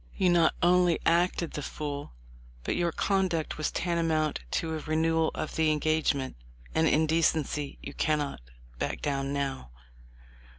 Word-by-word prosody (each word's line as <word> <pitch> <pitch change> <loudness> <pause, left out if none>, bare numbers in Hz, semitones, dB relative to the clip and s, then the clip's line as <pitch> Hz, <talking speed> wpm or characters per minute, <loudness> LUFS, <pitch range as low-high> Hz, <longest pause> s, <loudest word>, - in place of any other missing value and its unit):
"You 185 -3 +3
not 170 -2 +4
only 175 -1 +4
acted 170 0 +2
the 150 - -4
fool, 145 - -5 0.5
but - - -1
your 175 -1 +1
conduct 185 -5 0
was 155 - 0
tantamount 165 -3 0
to 160 - -1
a 160 - -2
renewal 160 +1 +1
of - - -4
the 160 -1 +3
engagement, 150 - 0 0.4
and 160 0 +3
in 155 +1 +3
decency 155 -3 0
you 140 - -7
cannot 150 - -1 0.4
back - - -3
down 140 -1 -1
now." 140 - -3
155 Hz, 140 wpm, -29 LUFS, 150-165 Hz, 0.5 s, not